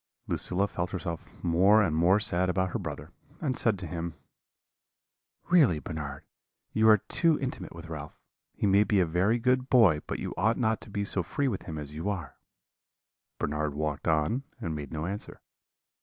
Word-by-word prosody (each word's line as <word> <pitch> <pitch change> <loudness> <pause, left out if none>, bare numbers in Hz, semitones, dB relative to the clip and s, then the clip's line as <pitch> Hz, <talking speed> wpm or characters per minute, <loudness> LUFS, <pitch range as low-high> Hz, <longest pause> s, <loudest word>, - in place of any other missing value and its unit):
"Lucilla 95 +3 +1
felt 90 -2 -3
herself 85 -3 -5
more 95 +6 +5
and 80 -5 0
more 90 +5 +4
sad 90 -3 +2
about 95 0 0
her 115 - -2
brother, 75 -3 -6 0.3
and 135 -5 -1
said 110 -5 +1
to 90 - -6
him: 85 +1 -5 1.4
"'Really, 145 - +5
Bernard, 75 -3 -6 0.5
you 110 0 +4
are 110 - +8
too 160 - +1
intimate 130 -9 -5
with 85 0 -9
Ralph; 75 -2 -8 0.4
he - - -1
may 100 +1 +5
be 105 -2 +2
a 90 - +4
very 90 +8 +2
good 125 +2 +1
boy, 100 - +5
but - - -3
you - - -4
ought 110 +6 +2
not 110 -3 0
to - - -12
be 100 0 -2
so 100 - -2
free 115 +11 -1
with 105 -7 -3
him 80 -2 -6
as 75 -1 -7
you 80 +6 -3
are.' 90 -9 -4 1.0
"Bernard 75 0 -2
walked 75 0 -3
on, 80 - +1 0.2
and 85 -9 -3
made 75 -3 -6
no 80 0 -3
answer. 100 +3 -6
90 Hz, 185 wpm, -28 LUFS, 80-110 Hz, 1.4 s, are